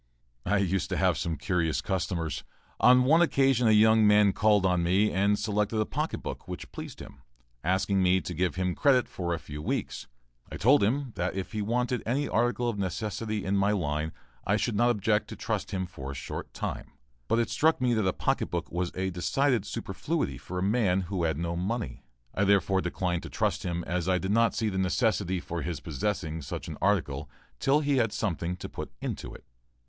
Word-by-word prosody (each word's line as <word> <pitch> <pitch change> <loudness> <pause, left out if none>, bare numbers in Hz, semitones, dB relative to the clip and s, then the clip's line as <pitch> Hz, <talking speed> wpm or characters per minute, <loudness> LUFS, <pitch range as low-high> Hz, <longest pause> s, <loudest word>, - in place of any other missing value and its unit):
I 105 +3 +3
used 95 -2 0
to - - -1
have - - +3
some 85 -1 -2
curious 85 -1 0
customers. 90 -4 -2 0.4
On 125 +1 +6
one 160 +6 +5
occasion 135 -6 +3
a - - +5
young 110 0 +6
man 105 -1 +5
called 105 -2 +3
on 90 -2 +2
me 95 +5 +3
and 100 +2 +2
selected 105 +1 0
a 110 - +2
pocket - - -3
book - - -6
which - - -7
pleased - - -8
him, 65 - -12 0.4
asking 95 +3 +1
me 95 0 +4
to 90 - -5
give 90 +2 0
him 90 0 0
credit 130 0 +3
for 85 -2 -4
a 85 - 0
few 75 -1 -8
weeks. - - -3 0.4
I - - -5
told 130 +9 +5
him 125 +6 0
that 90 +1 -1
if 95 -2 -4
he 110 - -2
wanted 120 +3 0
any 135 +5 0
article 120 +1 +1
of 110 -4 -2
necessity 105 +3 -3
in 95 +1 0
my 100 +2 +3
line, 80 -4 -1 0.3
I 100 - +2
should 115 -1 -1
not 120 +4 +3
object 105 -2 +1
to - - -7
trust - - -3
him 95 -1 -2
for 75 -6 -8
a 70 - -5
short - - -6
time, - - -5 0.3
but 115 - +2
it 115 - 0
struck 160 +1 +3
me 125 -1 +2
that 110 -4 +1
a - - +3
pocket - - -1
book - - -3
was 90 +1 -2
a 95 0 -1
decided 115 - +1
superfluity 115 - -3
for 90 - -7
a 90 - 0
man 100 -3 +2
who 90 -1 -2
had 80 -3 0
no 85 +1 -2
money; 90 - -3 0.3
I 100 - +1
therefore 100 -1 +3
declined 90 -1 -1
to - - -8
trust - - 0
him 85 -1 -3
as 90 +1 -2
I 90 - +3
did 95 +2 -2
not 115 +2 +3
see 110 -1 0
the 95 -2 -2
necessity 95 -1 +1
for 85 -1 -5
his 85 -2 -3
possessing 80 0 -3
such 70 - -6
an - - -7
article 80 -8 0 0.3
till 140 +3 +3
he 145 -2 +1
had 115 -4 +2
something 90 -4 -2
to 90 - -7
put - - -7
into - - -5
it. - - -13
100 Hz, 210 wpm, -28 LUFS, 90-115 Hz, 0.4 s, On